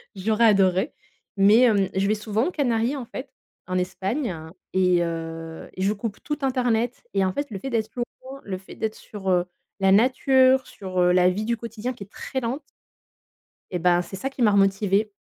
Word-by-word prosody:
J'aurais 215 +4 +2
adoré. 195 +2 +3 0.4
Mais, 210 +5 +6
heu, 195 -3 +2
je 195 +1 +1
vais 215 - +2
souvent 215 +3 -1
aux - - -2
Canaries, 245 -3 0
en 255 -4 -5
fait, 260 +3 -7 0.4
en 185 0 -1
Espagne 190 +6 -2 0.4
et 180 -2 +3
heu 165 -1 -5
et 185 - -6
je 205 +2 +2
coupe 210 0 -6
tout 295 - -2
internet 245 -3 0
et 195 -1 +2
en 185 - -1
fait, 285 -4 -3
le 195 - -5
fait 270 - -5
d'être 225 -2 -1 0.3
loin, 270 +1 -9
le 190 -2 -4
fait 190 - -13
d'être 220 0 -3
sur, 195 -3 -6
heu, 180 -1 +3 0.4
la 190 0 +4
nature, 260 +4 +4
sur, 185 -2 -5
heu, 180 - +4
la 180 0 +5
vie 205 +4 -2
du 235 +1 -1
quotidien 230 +2 -5
qui 220 - -9
est - - -26
très 265 - -4
lente 255 +4 -3 1.1
et 180 - -1
bah 175 +1 +3
c'est 190 - -8
ça 270 +8 -3
qui 270 - -8
m'a 215 -3 +5
remotivé 200 +1 +2
210 Hz, 200 wpm, -24 LUFS, 185-240 Hz, 1.1 s, Mais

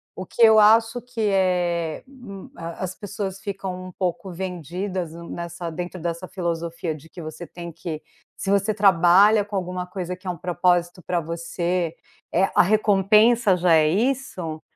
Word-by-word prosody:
O 185 - -6
que - - -5
eu 220 -1 +8
acho 225 +3 +5
que 245 -1 -6
é 175 -4 0
hum, 245 -8 -11
a 170 +2 -6
as 185 0 -3
pessoas 200 -1 -5
ficam 190 -2 -5
um - - -9
pouco 180 0 -3
vendidas 180 0 -4
n 170 0 -10
nessa 170 0 -5
dentro 175 +2 -6
dessa 170 +2 -4
filosofia 170 -2 -3
de 155 +1 -14
que 175 - -10
você 155 +2 -7
tem 170 -1 -8
que 160 -1 -6 0.4
se 195 - -4
você 200 +2 +2
trabalha 195 +2 +5
com 205 0 -7
alguma 180 -1 -3
coisa 180 -1 -5
que 185 +1 -13
é - - 0
um 175 - -3
propósito 175 +1 0
pra 175 +1 -1
você, 170 +1 -2 0.4
eh, 190 +3 +3
a - - +7
recompensa 210 +2 +4
já 175 -1 +3
é 155 -1 +5
isso, 190 - -1
180 Hz, 170 wpm, -23 LUFS, 170-200 Hz, 0.4 s, eu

